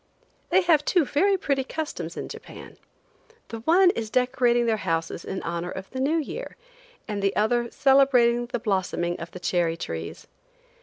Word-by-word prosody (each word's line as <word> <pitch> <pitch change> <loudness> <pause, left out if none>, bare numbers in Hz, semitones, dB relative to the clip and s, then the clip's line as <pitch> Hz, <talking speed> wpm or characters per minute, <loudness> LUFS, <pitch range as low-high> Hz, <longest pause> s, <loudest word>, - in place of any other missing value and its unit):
They 380 - +4
have 325 -4 +3
two 345 0 +2
very 385 +9 +2
pretty 275 -6 0
customs 315 +3 -5
in - - -4
Japan. - - -11 0.7
The 230 - -6
one 355 +9 +5
is 225 -7 -4
decorating 245 0 +2
their 225 -1 +1
houses 165 -3 -2
in 190 - -5
honor 170 +1 -3
of 190 +1 -8
the 260 - -5
new 290 +5 +1
year, 460 - -5 0.5
and 205 -2 -3
the 195 0 0
other 235 +3 +1
celebrating 250 -4 +4
the 245 0 -2
blossoming 190 -5 -1
of 165 - -7
the 180 - -10
cherry 175 -2 0
trees. 85 - -6
240 Hz, 165 wpm, -25 LUFS, 190-275 Hz, 0.7 s, one